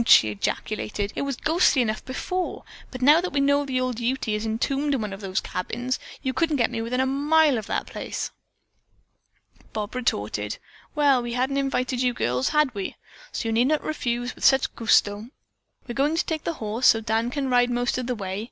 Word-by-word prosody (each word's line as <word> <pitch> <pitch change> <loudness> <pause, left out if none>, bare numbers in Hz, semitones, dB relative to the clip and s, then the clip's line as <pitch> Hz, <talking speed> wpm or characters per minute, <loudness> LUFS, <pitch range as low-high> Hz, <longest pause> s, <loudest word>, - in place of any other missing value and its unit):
she 110 - +7
ejaculated. 205 - -3
"It - - -2
was 280 -1 -2
ghostly 315 0 +3
enough 215 -2 -2
before, 360 +7 -3 0.3
but 255 -1 -6
now 300 +5 +7
that 360 - -3
we 285 - +1
know 285 +1 +3
that 255 -1 0
old 255 -2 -2
Ute 250 +2 -1
is 210 +1 -1
entombed 275 +6 0
in 255 - -2
one 210 -2 -4
of 195 - -8
those 190 -1 -1
cabins, 240 +8 -3 0.2
you 260 - -1
couldn't 325 0 +1
get 240 -4 +1
me 230 -2 -3
within 240 +3 -2
a 260 - +3
mile 290 +2 +3
of 215 - -9
the - - -1
place." - - -5 1.4
Bob 210 -1 -4
retorted: 105 - -2 0.4
"Well, 285 -4 +4
we 240 0 -4
hadn't 260 +3 0
invited 255 -2 0
you 250 -1 +1
girls, 125 +2 0
had 300 -4 +2
we? 200 -3 -4 0.4
So 225 - -3
you - - 0
need 240 +3 +3
not 305 +1 +1
refuse 245 -5 -2
with - - -12
such 265 -1 +4
gusto! 210 -1 +2 0.6
We're 240 - -4
going 285 +5 +1
to 335 - +1
take 315 -2 -3
the 335 - -1
horse, 225 -2 0
so - - +7
that 225 - -7
Dan 225 +1 +1
can 275 +1 -2
ride 245 0 +4
most 245 +1 0
of 250 - -4
the 250 - -1
way." 195 -2 -4
250 Hz, 210 wpm, -25 LUFS, 220-275 Hz, 1.4 s, she